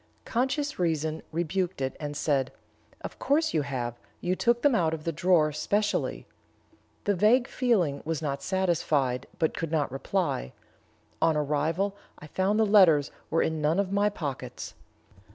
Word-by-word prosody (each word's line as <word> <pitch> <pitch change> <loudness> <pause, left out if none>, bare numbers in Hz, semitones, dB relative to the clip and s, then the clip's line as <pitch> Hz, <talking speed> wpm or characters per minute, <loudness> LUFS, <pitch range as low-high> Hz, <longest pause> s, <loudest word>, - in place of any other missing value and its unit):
Conscious 265 +4 -1
reason 160 -2 0
rebuked 175 +2 -1
it, 130 -1 -2
and 145 -1 -4
said, 135 -4 0 0.5
'Of - - -8
course 310 +3 +1
you 155 - +2
have; 125 -4 -4 0.2
you 180 +1 0
took 235 +4 +1
them 290 -2 +5
out 160 -7 +2
of 155 - -10
the 165 - -1
drawer 165 -1 +3
specially.' 205 +8 -1 0.8
The 205 - +2
vague 220 +6 +4
feeling 190 - +1
was 160 -1 -2
not 140 -3 -3
satisfied, 150 -8 0
but 160 - 0
could 165 -2 -3
not 150 -5 0
reply. 135 - -2 0.7
On 160 -1 +3
arrival 155 +7 0 0.2
I - - -11
found 190 +7 0
the 220 - +5
letters 180 -9 +5 0.2
were 165 - +2
in 160 -1 -1
none 155 +5 +2
of 195 -1 0
my 205 +1 +3
pockets. 150 -10 -6
165 Hz, 155 wpm, -28 LUFS, 150-200 Hz, 0.8 s, them